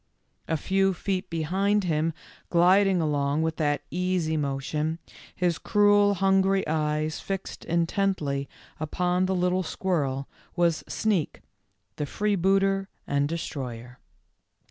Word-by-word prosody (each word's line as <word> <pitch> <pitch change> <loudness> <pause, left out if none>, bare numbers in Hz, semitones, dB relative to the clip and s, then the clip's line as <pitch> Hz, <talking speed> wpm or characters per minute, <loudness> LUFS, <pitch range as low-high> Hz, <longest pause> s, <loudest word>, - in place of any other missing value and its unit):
A 160 - 0
few 195 +3 +1
feet 190 +2 -2
behind 190 +6 +1
him, 160 -2 +1 0.4
gliding 185 +1 +4
along 145 0 0
with 160 0 -1
that 145 -2 0
easy 180 -3 0
motion, 150 +2 -2 0.4
his 175 -2 0
cruel, 205 -1 +4
hungry 195 0 +2
eyes 155 0 -1
fixed 195 -1 -5
intently 165 -5 0 0.3
upon 180 +4 0
the 190 - 0
little 180 +1 +1
squirrel, 145 -7 -1 0.3
was 170 -2 +1
Sneak, 200 -8 -1 0.6
the 150 - -2
free 210 +6 0
booter 195 +1 +2 0.2
and 140 0 0
destroyer. 125 -7 -5
170 Hz, 115 wpm, -26 LUFS, 150-195 Hz, 0.6 s, gliding